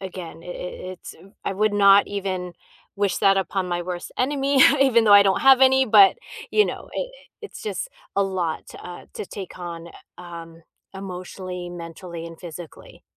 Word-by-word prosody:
again 180 Hz, -4 st, -8 dB
i -, -, -14 dB
i -, -, -7 dB, 0.4 s
it's 185 Hz, -, -11 dB, 0.3 s
I -, -, -1 dB
would 210 Hz, +2 st, +1 dB
not 200 Hz, 0 st, +6 dB
even 185 Hz, -3 st, -4 dB, 0.4 s
wish 200 Hz, -2 st, 0 dB
that 195 Hz, 0 st, +4 dB
upon 190 Hz, 0 st, -2 dB
my 175 Hz, 0 st, -1 dB
worst 175 Hz, 0 st, -6 dB
enemy 275 Hz, +1 st, +1 dB, 0.2 s
even 245 Hz, -4 st, +4 dB
though 210 Hz, -, +5 dB
I 205 Hz, 0 st, +9 dB
don't 195 Hz, -1 st, +1 dB
have 270 Hz, -1 st, +6 dB
any, 265 Hz, 0 st, +5 dB
but, 205 Hz, -3 st, +6 dB, 0.3 s
you 425 Hz, -, +4 dB
know, -, -, -7 dB
i -, -, -1 dB, 0.4 s
it's 430 Hz, -, -10 dB
just 440 Hz, +3 st, -4 dB, 0.3 s
a 200 Hz, -, +4 dB
lot, 185 Hz, -4 st, -2 dB
uh, 175 Hz, 0 st, -10 dB
to -, -, -5 dB
take 190 Hz, -2 st, -9 dB
on, 170 Hz, -1 st, -7 dB, 0.3 s
um, 165 Hz, -1 st, -10 dB, 0.3 s
emotionally, 185 Hz, -1 st, -7 dB
mentally, 170 Hz, 0 st, -8 dB
and 165 Hz, -1 st, -11 dB
physically. 170 Hz, -2 st, -11 dB
190 Hz, 170 wpm, -23 LUFS, 175-205 Hz, 0.4 s, I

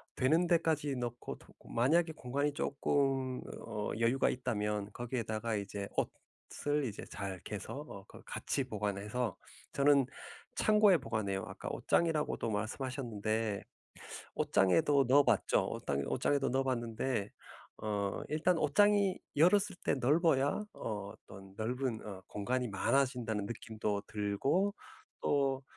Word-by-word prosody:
되는 160 Hz, +7 st, +3 dB
데까지 160 Hz, -5 st, +2 dB
넣고 120 Hz, -1 st, -4 dB
또 -, -, -20 dB
그 -, -, -18 dB
만약에 160 Hz, +8 st, +3 dB
공간이 140 Hz, +2 st, -1 dB
쪼끔 135 Hz, -2 st, 0 dB, 0.3 s
어 105 Hz, 0 st, -3 dB
여유가 120 Hz, +3 st, +3 dB
있다면 105 Hz, -4 st, -1 dB
거기에다가 115 Hz, -2 st, -2 dB
이제 100 Hz, 0 st, -4 dB, 0.7 s
옷을 145 Hz, 0 st, 0 dB
이제 110 Hz, -5 st, -5 dB
잘 95 Hz, -2 st, -5 dB
개서 -, -, -6 dB
어 -, -, -9 dB
그 -, -, -13 dB
같이 135 Hz, -, -2 dB
보관해서 105 Hz, -1 st, -2 dB, 0.4 s
저는 140 Hz, -1 st, +5 dB, 0.5 s
창고에 210 Hz, -3 st, +5 dB
보관해요. 110 Hz, -, -2 dB
아까 -, -, -6 dB
옷장이라고도 155 Hz, -8 st, +1 dB
말씀하셨는데, 110 Hz, -2 st, -2 dB, 0.8 s
옷장에도 100 Hz, -, +4 dB
넣어 140 Hz, +2 st, +7 dB
봤죠. -, -, +3 dB
옷땅 70 Hz, 0 st, -2 dB
옷장에도 140 Hz, -2 st, +1 dB
넣어 135 Hz, +2 st, +2 dB
봤는데 120 Hz, -3 st, -1 dB, 0.5 s
어 100 Hz, -2 st, -1 dB
일단 160 Hz, +4 st, +2 dB
옷장이 205 Hz, +4 st, +4 dB, 0.2 s
열었을 190 Hz, +5 st, +4 dB
때 -, -, +3 dB
넓어야 145 Hz, +5 st, +3 dB
어 105 Hz, -2 st, -4 dB
어떤 95 Hz, 0 st, -13 dB
넓은 125 Hz, +1 st, -2 dB
어 95 Hz, -2 st, -7 dB
공간이 125 Hz, +4 st, -1 dB
많아진다는 110 Hz, -1 st, +1 dB
느낌도 110 Hz, -3 st, -3 dB
들고 120 Hz, -, +1 dB, 0.5 s
또 135 Hz, -2 st, +1 dB
125 Hz, 280 characters per minute, -33 LUFS, 105-145 Hz, 0.8 s, 넣어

